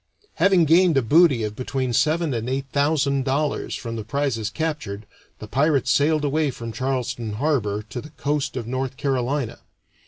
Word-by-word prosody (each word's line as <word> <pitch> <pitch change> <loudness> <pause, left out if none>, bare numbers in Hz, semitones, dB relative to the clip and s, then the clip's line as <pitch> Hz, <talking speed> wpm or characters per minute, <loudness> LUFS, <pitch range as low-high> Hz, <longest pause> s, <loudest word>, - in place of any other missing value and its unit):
Having 190 -4 +4
gained 165 0 +4
a 135 - +3
booty 145 -1 +4
of 105 0 -3
between 130 0 -2
seven 155 +2 +1
and 115 +1 -3
eight 135 +1 -2
thousand 140 -2 +2
dollars 140 +2 -1
from 115 -1 -5
the 110 - -4
prizes 125 -3 -1
captured, 120 -9 -4 0.3
the 110 - -9
pirates 140 +1 +2
sailed 150 +1 +2
away 150 +1 +1
from 115 -3 -6
Charleston 125 -4 -2
Harbor 105 -5 0
to 120 +3 -7
the 150 - -11
coast 145 -3 -2
of 120 - -3
North 130 +2 -3
Carolina. 135 -1 -1
135 Hz, 165 wpm, -23 LUFS, 120-150 Hz, 0.3 s, Having